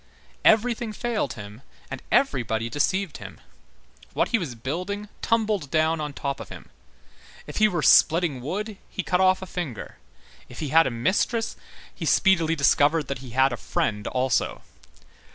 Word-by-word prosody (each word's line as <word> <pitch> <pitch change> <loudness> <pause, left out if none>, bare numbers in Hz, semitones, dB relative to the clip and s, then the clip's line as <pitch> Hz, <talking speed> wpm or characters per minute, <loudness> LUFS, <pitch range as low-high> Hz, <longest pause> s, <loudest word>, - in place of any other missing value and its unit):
Everything 230 0 +3
failed 220 - -2
him 105 +2 -10 0.3
and - - -5
everybody 115 - +1
deceived 185 +3 0
him; - - -11 0.7
what - - +1
he 230 - +2
was 145 -10 -5
building 180 - -4
tumbled 215 -9 0
down 160 +1 +1
on 150 -1 -3
top 140 -1 -4
of - - -9
him. - - -11 0.8
If - - -8
he 215 - +5
were 175 -7 -2
splitting 160 -5 +4
wood, 205 - -4
he 190 - -4
cut 180 +1 +1
off 190 0 +3
a - - -5
finger. 170 - -6 0.5
If 125 - -12
he 150 - -3
had 165 +3 +5
a - - 0
mistress, 190 - 0 0.4
he - - -6
speedily 170 -5 +3
discovered 145 +1 +3
that 140 - -3
he 130 -1 -10
had 130 -1 +4
a - - -4
friend 105 -2 -2
also. 130 0 -1
160 Hz, 160 wpm, -25 LUFS, 130-200 Hz, 0.8 s, he